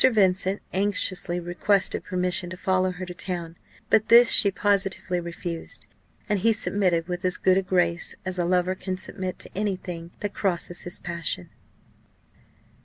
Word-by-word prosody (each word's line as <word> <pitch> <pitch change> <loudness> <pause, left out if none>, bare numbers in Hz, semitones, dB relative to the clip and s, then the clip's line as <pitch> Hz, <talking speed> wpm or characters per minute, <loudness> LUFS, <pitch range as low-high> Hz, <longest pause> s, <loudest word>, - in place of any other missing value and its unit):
Vincent 195 -4 +3
anxiously 185 -2 +1
requested 175 +3 0
permission 180 -1 -1
to 185 - -7
follow 185 0 +1
her 185 0 -6
to 180 - -7
town: 175 -2 -3 0.4
but 220 - +4
this 235 +1 +8
she 205 - +6
positively 195 -2 0
refused; 170 -1 -6 0.4
and 210 -2 +1
he 225 +4 +3
submitted 180 -6 0
with 180 -1 -4
as 185 -1 +1
good 185 -1 +3
a - - 0
grace 175 -2 0
as 185 -1 -3
a 175 - +1
lover 180 +1 +2
can 185 0 -4
submit 185 0 -5
to - - -5
any 200 0 0
thing 170 -2 -7
that 205 -1 -3
crosses 175 -2 -2
his 175 - -2
passion. 170 - -3
185 Hz, 160 wpm, -25 LUFS, 175-195 Hz, 0.4 s, this